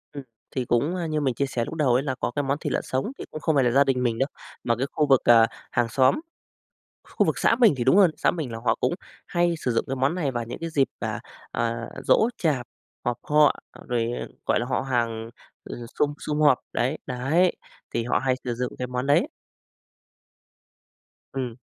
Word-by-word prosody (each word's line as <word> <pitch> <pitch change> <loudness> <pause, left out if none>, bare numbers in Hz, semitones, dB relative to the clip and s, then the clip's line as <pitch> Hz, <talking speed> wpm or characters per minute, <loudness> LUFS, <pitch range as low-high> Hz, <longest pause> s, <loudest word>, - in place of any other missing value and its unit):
Ừm, 140 -1 -6 0.3
thì 130 -2 -1
cũng, 140 +10 +1
a, 175 -2 -2
như 155 -1 -1
mình 135 -3 +1
chia 140 - 0
sẻ 120 -3 -2
lúc - - -7
đầu 145 -6 +2
ấy 130 +3 +2
là 135 -3 -2
có - - -1
cái 145 - 0
món 140 +1 0
thịt 150 -3 -3
lợn - - +1
sống 130 - -2
thì - - -7
cũng 155 - -7
không 160 - +1
phải 135 - +4
là 120 - +2
gia 140 +3 +5
đình 130 -2 0
mình 115 -2 0
đâu. 135 - +2 0.4
Mà 115 - +1
cái 130 +4 -2
khu 150 - +1
vực, 135 -2 +5
à, 115 -1 +7 0.2
hàng 120 -1 +1
xóm, 130 - +3 0.8
khu - - 0
vực - - 0
xã 230 - +3
mình 225 -10 +6
thì 120 - -1
đúng 135 +8 +5
hơn, 195 -4 +7
xã - - +2
mình 155 -9 -4
là 115 - -5
họ - - +3
cũng - - +1 0.3
hay 175 -1 +1
sử 130 - -1
dụng 115 - +1
cái 135 - -3
món 135 +5 +1
này 165 -7 -1
vào 120 -1 -2
những 115 - -7
cái 165 0 -4
dịp, 140 -4 +2
à, - - -3 0.3
à, 115 0 -2 0.2
giỗ 220 - +4
chạp, 140 -7 0 0.4
họp 120 -1 0
họ 150 0 +4 0.3
rồi, 120 -1 0 0.3
gọi - - +2
là, 120 - -2
họ 130 - 0
hàng, 115 -3 -1 0.3
ờ, - - -7 0.2
sum 145 0 +2
sum 150 0 -2
họp 145 -4 +5
đấy, 130 +6 0
đấy, 140 +8 +1 0.4
thì 115 - 0
họ 120 - +1
hay 130 -1 +1
sử 120 -2 -2
dụng 125 +1 -3
cái 125 - -2
món 125 +1 -3
đấy. 145 - +3 2.1
Ừm. 125 -4 -3
130 Hz, 225 wpm, -25 LUFS, 120-150 Hz, 2.1 s, à